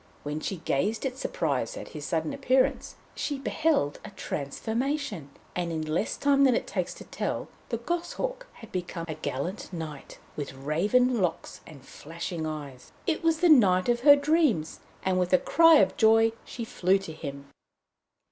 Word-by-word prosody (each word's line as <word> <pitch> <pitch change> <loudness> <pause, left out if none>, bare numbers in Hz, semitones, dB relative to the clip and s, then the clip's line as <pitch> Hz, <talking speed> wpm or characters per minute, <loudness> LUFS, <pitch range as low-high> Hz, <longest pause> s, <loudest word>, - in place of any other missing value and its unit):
While 150 +1 -3
she 190 +4 -3
gazed 195 - -1
in 260 -1 -2
surprise 140 - -2
at - - -8
his 150 -2 -7
sudden 160 -1 -1
appearance, 265 -1 +1 0.2
she 290 - -3
beheld 270 - 0
a - - -8
transformation, 225 - -3 0.3
and 175 -1 -2
in 160 -1 -2
less 155 +7 -1
time 280 -1 +3
than 260 -3 +5
it - - -1
takes - - -3
to - - -10
tell, - - -4 0.2
the 230 - -1
goshawk 350 - -3
had 225 - -13
become 175 -2 -4
a 160 - -3
gallant 150 +7 -4
knight, 160 -5 -7 0.2
with 140 -2 -5
raven 205 - +2
locks 175 -3 -2
and 140 -5 -13
flashing 165 +2 -6
eyes. 145 -5 -7
It 330 - -1
was 325 -1 +2
the 355 - +5
knight 195 -9 +5
of 240 0 +2
her 285 +3 +8
dreams, 285 - +1 0.2
and 185 -1 +1
with 180 0 0
a - - +8
cry 330 - +6
of - - +4
joy 225 0 +5
she 235 - -6
flew 190 -3 +2
to 190 -5 -8
him. 140 -2 -7
190 Hz, 170 wpm, -27 LUFS, -, 0.3 s, her